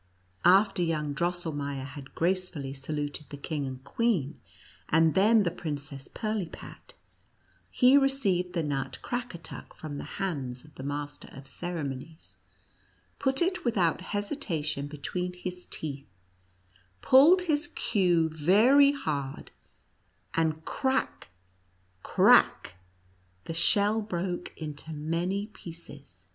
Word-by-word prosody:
After 195 Hz, +1 st, +5 dB
young 155 Hz, -4 st, 0 dB
Drosselmeier 145 Hz, -5 st, -2 dB
had 140 Hz, 0 st, -10 dB
gracefully 170 Hz, -6 st, -1 dB
saluted 145 Hz, +1 st, -4 dB
the 145 Hz, -, -7 dB
king 145 Hz, -1 st, -3 dB
and 130 Hz, 0 st, -7 dB
queen, 160 Hz, -, 0 dB, 0.5 s
and 160 Hz, 0 st, +4 dB
then 210 Hz, +3 st, +5 dB
the 170 Hz, -, 0 dB
Princess 145 Hz, -4 st, -6 dB
Pirlipat, 215 Hz, -6 st, -5 dB, 0.7 s
he 260 Hz, +2 st, +6 dB
received 200 Hz, -11 st, +1 dB
the 170 Hz, -3 st, 0 dB
nut 140 Hz, -3 st, -3 dB
Crack 245 Hz, -2 st, -3 dB
atuck 170 Hz, -, -10 dB
from 145 Hz, -2 st, -6 dB
the -, -, -5 dB
hands 140 Hz, -10 st, -3 dB
of 150 Hz, -, -18 dB
the -, -, -10 dB
master 145 Hz, +1 st, -5 dB
of 135 Hz, -, -10 dB
ceremo 155 Hz, -1 st, -4 dB
nies, 150 Hz, -, -16 dB, 0.8 s
put 270 Hz, +4 st, +2 dB
it 365 Hz, +1 st, -1 dB
without 185 Hz, -9 st, +1 dB
hesitation 185 Hz, -, -3 dB
between 180 Hz, +5 st, -4 dB
his 180 Hz, 0 st, -7 dB
teeth, 140 Hz, -5 st, -6 dB, 1.0 s
pulled 320 Hz, +8 st, +7 dB
his 305 Hz, -4 st, 0 dB
queue 180 Hz, -7 st, +2 dB
very 215 Hz, -, +5 dB
hard, 140 Hz, -, -4 dB, 0.8 s
and 160 Hz, -1 st, 0 dB
crack 265 Hz, -, -1 dB, 0.4 s
— 90 Hz, 0 st, -39 dB
crack -, -, +4 dB, 0.4 s
— 90 Hz, 0 st, -37 dB
the -, -, -4 dB
shell 205 Hz, +6 st, +3 dB
broke 180 Hz, -3 st, -3 dB
into 155 Hz, 0 st, -6 dB
many 170 Hz, +6 st, -1 dB
pieces. 145 Hz, -, -12 dB
165 Hz, 120 wpm, -28 LUFS, 145-200 Hz, 1.0 s, pulled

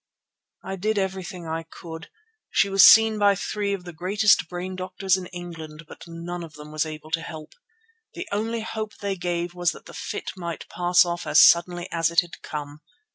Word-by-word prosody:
"I 190 Hz, +2 st, -5 dB
did 215 Hz, +3 st, -1 dB
everything 190 Hz, -2 st, -3 dB
I 160 Hz, 0 st, -3 dB
could. 160 Hz, 0 st, -10 dB, 0.4 s
She 200 Hz, -, +2 dB
was 195 Hz, 0 st, +6 dB
seen 220 Hz, -1 st, +8 dB
by 200 Hz, -1 st, +5 dB
three 205 Hz, +1 st, -2 dB
of 195 Hz, -2 st, -3 dB
the 175 Hz, -1 st, -9 dB
greatest 195 Hz, +1 st, +2 dB
brain 180 Hz, +1 st, -5 dB
doctors 185 Hz, 0 st, 0 dB
in 185 Hz, -1 st, -5 dB
England, 165 Hz, -3 st, -9 dB
but -, -, -12 dB
none 170 Hz, +1 st, -6 dB
of 160 Hz, -2 st, -10 dB
them 150 Hz, 0 st, -11 dB
was 155 Hz, +1 st, -1 dB
able 155 Hz, 0 st, -9 dB
to 165 Hz, -, 0 dB
help. 160 Hz, -2 st, -9 dB, 0.6 s
The -, -, -6 dB
only 225 Hz, +3 st, -1 dB
hope 220 Hz, -1 st, -5 dB
they 200 Hz, -1 st, -2 dB
gave 175 Hz, -1 st, -3 dB
was 175 Hz, -2 st, 0 dB
that -, -, -14 dB
the -, -, -12 dB
fit -, -, -5 dB
might 170 Hz, -3 st, -6 dB
pass 175 Hz, 0 st, +4 dB
off 175 Hz, 0 st, -4 dB
as -, -, +5 dB
suddenly 175 Hz, +1 st, +5 dB
as 165 Hz, -1 st, +1 dB
it 170 Hz, -, +4 dB
had 175 Hz, -1 st, -12 dB
come. 150 Hz, 0 st, -7 dB
175 Hz, 195 wpm, -24 LUFS, 165-195 Hz, 0.6 s, seen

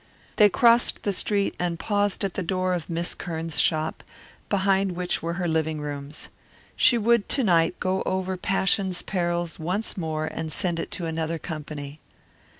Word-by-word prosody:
They 210 Hz, -1 st, +7 dB
crossed 235 Hz, +2 st, +4 dB
the 200 Hz, -, 0 dB
street 200 Hz, +1 st, 0 dB
and 175 Hz, -1 st, -1 dB
paused 205 Hz, +1 st, 0 dB
at 195 Hz, -2 st, -1 dB
the -, -, -2 dB
door 185 Hz, 0 st, 0 dB
of 175 Hz, -2 st, -3 dB
Miss 170 Hz, +1 st, -2 dB
Kearns' 165 Hz, -2 st, -4 dB
shop, 155 Hz, -1 st, +1 dB, 0.5 s
behind 195 Hz, -1 st, +2 dB
which 180 Hz, 0 st, 0 dB
were 170 Hz, +1 st, -2 dB
her 175 Hz, 0 st, -2 dB
living 160 Hz, -1 st, 0 dB
rooms. 145 Hz, 0 st, -6 dB, 0.5 s
She 240 Hz, -, +5 dB
would 235 Hz, -1 st, +2 dB
to 270 Hz, -, +2 dB
night 170 Hz, -4 st, +3 dB
go 185 Hz, +1 st, 0 dB
over 190 Hz, 0 st, -1 dB
Passion's 190 Hz, 0 st, +1 dB
Perils 175 Hz, -2 st, -2 dB
once 185 Hz, +7 st, -2 dB
more 155 Hz, -3 st, -2 dB
and 160 Hz, 0 st, -4 dB
send 170 Hz, +1 st, 0 dB
it -, -, -4 dB
to 175 Hz, -, -3 dB
another 160 Hz, 0 st, -2 dB
company. 150 Hz, -2 st, -7 dB
175 Hz, 165 wpm, -25 LUFS, 160-195 Hz, 0.5 s, They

